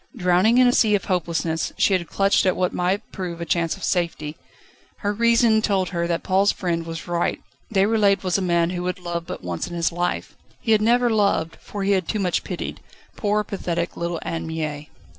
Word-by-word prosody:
Drowning 185 Hz, +3 st, +3 dB
in 255 Hz, -, +6 dB
a -, -, +5 dB
sea 215 Hz, -4 st, +4 dB
of 200 Hz, -, -2 dB
hopelessness, 170 Hz, -3 st, -1 dB
she 200 Hz, -, +3 dB
had 175 Hz, -3 st, 0 dB
clutched 195 Hz, -1 st, +2 dB
at 185 Hz, -, +3 dB
what 180 Hz, -1 st, 0 dB
might 190 Hz, +4 st, -1 dB
prove 180 Hz, -3 st, -5 dB
a 170 Hz, -, -4 dB
chance 165 Hz, 0 st, 0 dB
of -, -, -12 dB
safety. 165 Hz, -4 st, -1 dB, 0.7 s
Her 205 Hz, 0 st, 0 dB
reason 230 Hz, 0 st, +4 dB
told 195 Hz, -4 st, +1 dB
her 170 Hz, -1 st, -1 dB
that 170 Hz, -1 st, -1 dB
Paul's 195 Hz, +2 st, +3 dB
friend 170 Hz, -3 st, -2 dB
was 165 Hz, 0 st, -6 dB
right. 175 Hz, 0 st, 0 dB, 0.3 s
Déroulède 200 Hz, -1 st, +3 dB
was 185 Hz, -2 st, 0 dB
a 195 Hz, -, +2 dB
man 170 Hz, -1 st, +2 dB
who 180 Hz, -1 st, -3 dB
would 180 Hz, +2 st, -2 dB
love 175 Hz, -1 st, -5 dB
but -, -, -6 dB
once 85 Hz, -1 st, -3 dB
in 175 Hz, -, -7 dB
his 170 Hz, 0 st, +1 dB
life. 175 Hz, +1 st, -2 dB, 0.3 s
He 225 Hz, -, -1 dB
had 215 Hz, -1 st, +5 dB
never 240 Hz, +2 st, +3 dB
loved 200 Hz, -6 st, +1 dB
for 205 Hz, -1 st, -6 dB
he 200 Hz, -, +1 dB
had 185 Hz, -3 st, +1 dB
too 215 Hz, -, -1 dB
much 185 Hz, -3 st, 0 dB
pitied -, -, -5 dB, 0.4 s
poor, 210 Hz, 0 st, 0 dB
pathetic 170 Hz, -4 st, -3 dB
little 170 Hz, 0 st, -2 dB
Anne 165 Hz, 0 st, -4 dB
Mie. 155 Hz, -2 st, -4 dB
180 Hz, 210 wpm, -23 LUFS, 170-205 Hz, 0.7 s, in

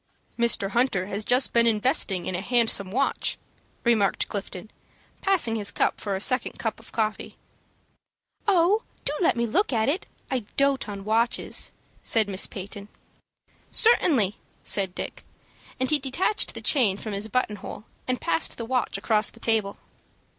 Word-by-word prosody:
"Mr. 235 Hz, -4 st, +3 dB
Hunter 235 Hz, -5 st, +1 dB
has 200 Hz, +2 st, -1 dB
just 250 Hz, +4 st, +3 dB
been 235 Hz, 0 st, +4 dB
investing 210 Hz, -4 st, +1 dB
in -, -, -3 dB
a 180 Hz, -, -2 dB
handsome 225 Hz, -4 st, +2 dB
watch," 270 Hz, +7 st, 0 dB, 0.5 s
remarked 220 Hz, -5 st, +2 dB
Clifton, 200 Hz, 0 st, -6 dB, 0.5 s
passing 360 Hz, -13 st, +1 dB
his 205 Hz, -2 st, +1 dB
cup -, -, 0 dB
for 200 Hz, -2 st, -2 dB
a -, -, -3 dB
second 255 Hz, +4 st, +1 dB
cup 225 Hz, -1 st, -3 dB
of 225 Hz, -, -13 dB
coffee. 215 Hz, -1 st, -2 dB, 1.1 s
"Oh, 385 Hz, +2 st, +4 dB, 0.2 s
do 285 Hz, -, -1 dB
let 335 Hz, -, +3 dB
me 235 Hz, -, +1 dB
look 360 Hz, -, +1 dB
at 225 Hz, 0 st, +1 dB
it! 335 Hz, +7 st, -2 dB, 0.2 s
I 260 Hz, -, +1 dB, 0.2 s
dote 275 Hz, -4 st, +1 dB
on 200 Hz, -1 st, -7 dB
watches," 230 Hz, +2 st, +1 dB, 0.3 s
said 220 Hz, -2 st, +2 dB
Miss 190 Hz, -1 st, +1 dB
Peyton. 200 Hz, +1 st, -8 dB, 0.8 s
"Certainly," 265 Hz, -, +3 dB, 0.3 s
said 190 Hz, -2 st, +1 dB
Dick; -, -, -6 dB, 0.6 s
and 260 Hz, -, +1 dB
he 300 Hz, -, +4 dB
detached 285 Hz, +10 st, +1 dB
the -, -, -4 dB
chain 225 Hz, -10 st, +3 dB
from 215 Hz, 0 st, -6 dB
his 200 Hz, +2 st, -3 dB
button 220 Hz, -2 st, -1 dB
hole, 205 Hz, -, -8 dB, 0.2 s
and 255 Hz, 0 st, -1 dB
passed 165 Hz, 0 st, +1 dB
the 230 Hz, -, -5 dB
watch 250 Hz, +1 st, -1 dB
across 215 Hz, -1 st, +2 dB
the 230 Hz, -, -14 dB
table. 220 Hz, -4 st, 0 dB
225 Hz, 160 wpm, -25 LUFS, 200-255 Hz, 1.1 s, been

